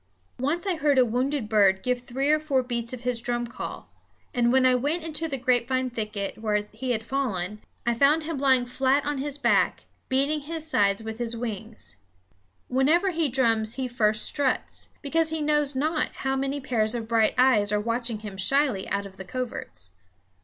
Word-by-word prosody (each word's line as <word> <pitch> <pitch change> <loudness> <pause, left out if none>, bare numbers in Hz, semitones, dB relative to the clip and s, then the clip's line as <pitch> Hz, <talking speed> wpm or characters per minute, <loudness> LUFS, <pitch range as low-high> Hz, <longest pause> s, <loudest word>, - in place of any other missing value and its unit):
Once 300 +8 -1
I 375 -4 0
heard 290 -2 +2
a 255 - +6
wounded 250 +1 -1
bird 200 -3 +3
give 250 -1 0
three 265 +4 0
or 310 - +4
four 280 -4 0
beats 235 -2 -3
of 255 -2 -6
his 250 -2 -1
drum 240 0 -1
call, 235 - -7 0.5
and 240 -1 +2
when 260 0 +4
I 255 - +5
went 290 +7 0
into 325 0 -3
the 275 -3 -3
grapevine 255 0 +1
thicket, 215 -4 -4
where 210 -1 -1
he 250 +4 -5
had 225 -3 0
fallen, 215 -6 -2 0.2
I 240 - +2
found 280 +6 +3
him 310 -2 -4
lying 260 -3 +4
flat 265 +3 +1
on 290 -1 -1
his 285 +1 -1
back, 280 - +2 0.2
beating 280 +4 +2
his 315 +2 -6
sides 200 -7 +2
with 220 +1 -6
his 235 -1 -2
wings. 215 - -5 0.7
Whenever 310 +9 +2
he 325 -3 0
drums 230 -3 +2
he 260 -1 -2
first 215 -3 +2
struts, 280 -2 0
because 320 +3 +1
he 320 0 -2
knows 295 -2 +1
not 305 +3 0 0.2
how 270 0 +1
many 275 +1 -1
pairs 235 -4 0
of 230 -2 -4
bright 225 -1 +2
eyes 235 -5 +4
are 210 - +2
watching 230 0 -2
him 205 -3 -7
shyly 260 0 +2
out 200 0 -1
of 190 -1 -12
the 190 - -7
coverts. 185 - -6
250 Hz, 190 wpm, -26 LUFS, 220-280 Hz, 0.7 s, a